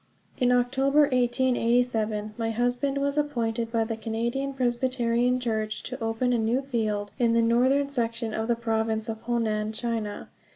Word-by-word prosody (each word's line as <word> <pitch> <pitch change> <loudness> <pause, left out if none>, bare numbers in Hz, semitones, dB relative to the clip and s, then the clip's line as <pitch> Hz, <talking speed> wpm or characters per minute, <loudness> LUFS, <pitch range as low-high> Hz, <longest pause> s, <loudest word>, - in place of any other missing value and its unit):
In 250 -2 +3
October, 265 +4 +3
1887, 240 -4 +1
my 225 -1 -2
husband 245 +4 0
was 280 +1 0
appointed 235 -5 -1
by 230 -1 +2
the 225 0 -3
Canadian 235 +5 -2
Presbyterian 245 -1 +1
Church 220 -3 -2
to 255 -2 -6
open 225 +3 0
a 235 - +2
new 235 +5 +1
field, 215 -6 -2
in 235 -2 +3
the 230 - +4
northern 260 +5 +3
section 230 -4 -2
of 220 +1 -2
the 235 - +2
Province 225 -1 -1
of 220 0 -5
Honan, 220 -2 -1
China. 225 -2 -3
235 Hz, 155 wpm, -26 LUFS, 225-250 Hz, -, the